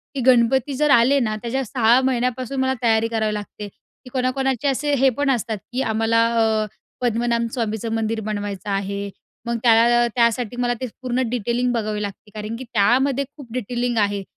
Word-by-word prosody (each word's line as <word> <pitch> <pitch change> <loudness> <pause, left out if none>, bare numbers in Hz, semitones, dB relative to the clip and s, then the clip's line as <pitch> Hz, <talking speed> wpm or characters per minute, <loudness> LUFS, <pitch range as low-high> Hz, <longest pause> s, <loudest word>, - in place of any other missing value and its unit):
की 270 - -1
गणपती 260 +2 +3
जर 300 +3 +1
आले 255 +4 +5
ना, 215 -4 -1
त्याच्या 255 +3 -2
6 240 +1 +3
महिन्यापासून 255 0 -1
मला 260 0 +1
तयारी 225 -1 +3
करावी 220 -2 -1
लागते, 210 0 -6
की 250 +5 -19
कोणाकोणाचे 265 0 0
असे 285 +2 0
हे 270 0 +4
पण 285 -1 +1
असतात, 230 -3 -1
की 255 +2 -1
आम्हाला 225 0 +2 0.2
अ, 220 -1 +2 0.4
पद्मनाभ 235 0 +1
स्वामीचं 225 -2 -2
मंदिर 225 0 -1
बनवायचं 205 -1 -4
आहे. 200 0 -2 0.4
मग 235 0 -1
त्याला 235 0 +5
अ, - - +2
त्यासाठी 235 0 +1
मला 245 0 +1
ते - - -1 0.2
पूर्ण 255 0 -1
डिटेलिंग 245 +1 0
बघावी 215 -2 -2
लागते. 205 +1 -7
कारण 215 +2 -5
की - - -6
त्यामध्ये 260 +6 +2
खूप 255 -5 -12
डिटेलिंग 245 0 -2
आहे 200 -1 0
235 Hz, 175 wpm, -21 LUFS, 220-255 Hz, 0.4 s, आले